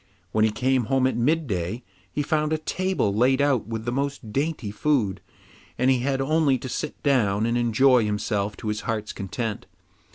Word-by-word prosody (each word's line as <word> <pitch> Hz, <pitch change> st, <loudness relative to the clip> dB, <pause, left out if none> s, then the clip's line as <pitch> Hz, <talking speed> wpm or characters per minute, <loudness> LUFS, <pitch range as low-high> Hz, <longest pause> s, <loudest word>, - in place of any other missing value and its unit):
When 110 Hz, +2 st, +2 dB
he 110 Hz, -, +4 dB
came 125 Hz, +3 st, +1 dB
home 130 Hz, +3 st, +2 dB
at 130 Hz, -, +1 dB
midday, 120 Hz, -, 0 dB, 0.3 s
he 145 Hz, -, -1 dB
found 155 Hz, +1 st, 0 dB
a 155 Hz, -, +2 dB
table 185 Hz, -, -1 dB
laid 125 Hz, +5 st, +3 dB
out 140 Hz, -6 st, +2 dB
with 115 Hz, -1 st, -4 dB
the 120 Hz, -, -1 dB
most 135 Hz, -4 st, -3 dB
dainty 140 Hz, -7 st, -1 dB
food, 110 Hz, -4 st, 0 dB, 0.6 s
and 130 Hz, +2 st, +3 dB
he 130 Hz, -, +2 dB
had 135 Hz, +2 st, 0 dB
only 145 Hz, -1 st, +2 dB
to 130 Hz, +1 st, -7 dB
sit 150 Hz, +4 st, -5 dB
down 110 Hz, -7 st, +2 dB
and 115 Hz, +1 st, 0 dB
enjoy 120 Hz, +1 st, +4 dB
himself 105 Hz, -1 st, -1 dB
to 110 Hz, -, -4 dB
his 105 Hz, 0 st, -2 dB
heart's 110 Hz, -2 st, -3 dB
content. 105 Hz, +2 st, -4 dB
125 Hz, 185 wpm, -25 LUFS, 110-140 Hz, 0.6 s, he